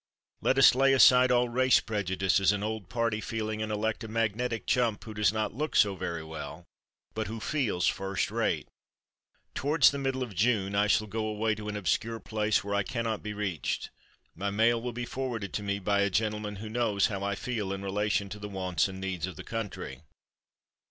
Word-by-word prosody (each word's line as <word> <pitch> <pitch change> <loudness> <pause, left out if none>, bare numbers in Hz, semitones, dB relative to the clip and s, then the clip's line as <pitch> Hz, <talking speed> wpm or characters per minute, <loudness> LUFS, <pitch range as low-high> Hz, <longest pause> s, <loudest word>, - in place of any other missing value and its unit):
Let 135 - +2
us 135 -3 +8
lay 135 +1 +4
aside 130 -1 +7
all 125 0 +3
race 130 +2 +4
prejudices 95 -2 +1
and 105 0 -2
old 110 -3 -4
party 115 -2 0
feeling 110 -1 -3
and 110 0 -2
elect 110 +1 -1
a - - -5
magnetic 115 +1 -1
chump 120 -5 +1
who 110 - -8
does 105 -2 +2
not 110 0 -2
look 150 +6 -3
so 100 -3 +4
very 85 -3 -4
well, 80 +1 -8 0.5
but - - -3
who 110 +2 -5
feels 115 -9 0
first 95 0 -1
rate. - - 0 0.9
Towards 145 +2 +4
the 140 - -4
middle 135 -1 -1
of 120 -5 -7
June 100 0 +1
I 100 +1 +3
shall 110 +1 +3
go 110 +1 -3
away 110 +1 0
to 105 0 -6
an 105 - -3
obscure 115 +4 -1
place 105 -3 0
where 100 0 -3
I 100 - +2
cannot 115 +1 -2
be 105 0 -5
reached. 100 -6 -3 0.4
My 100 +4 -3
mail 115 +3 +2
will 125 +1 -3
be 120 +1 -4
forwarded 120 -6 -4
to - - -2
me 100 0 -1
by 100 +1 0
a 100 0 +3
gentleman 105 +1 -1
who 105 +3 -7
knows 110 -3 +1
how 100 -2 -2
I 100 0 -1
feel 105 -3 -3
in 95 0 -4
relation 100 +1 0
to 105 - -7
the 105 0 -6
wants 95 -4 0
and 95 0 -8
needs 95 -2 -3
of 90 - -7
the - - -8
country. 100 - -5
105 Hz, 205 wpm, -29 LUFS, 100-115 Hz, 0.9 s, us